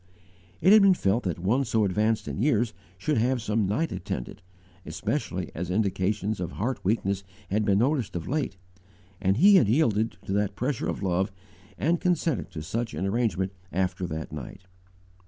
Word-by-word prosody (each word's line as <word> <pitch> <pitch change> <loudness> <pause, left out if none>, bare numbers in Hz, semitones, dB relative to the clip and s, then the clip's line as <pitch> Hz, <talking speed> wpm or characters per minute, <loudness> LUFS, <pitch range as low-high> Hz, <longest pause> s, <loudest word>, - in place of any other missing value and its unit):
It 185 +5 +6
had 215 - +8
been 195 -2 +6
felt 100 - +1
that 90 -4 -1
one 105 +10 +1
so 110 -3 +1
advanced 105 +3 +1
in - - -3
years 120 -4 +2 0.2
should 145 +7 0
have 125 +3 +1
some 110 -2 0
night 150 +12 0
attendant, 90 - -5 0.4
especially - - -3
as 85 +2 -4
indications 100 +1 0
of 90 - -4
heart 125 +6 -2
weakness 100 -1 0 0.3
had 105 +1 +1
been 100 -2 +3
noticed 125 -1 +1
of 85 -2 -4
late, 140 -9 -2 0.6
and 95 +1 +2
he 195 +7 +7
had 120 - +4
yielded 115 -3 +2
to 95 - -2
the 105 0 +2
pressure 140 +8 -1
of - - -3
love 95 +1 +1 0.5
and 165 +3 +1
consented 170 -6 0
to 80 -4 -7
such 115 +2 -3
an 85 +5 -2
arrangement 95 -3 0 0.2
_after 95 0 -1
that 80 -1 -5
night. 75 +3 -8
105 Hz, 175 wpm, -27 LUFS, 95-125 Hz, 0.6 s, had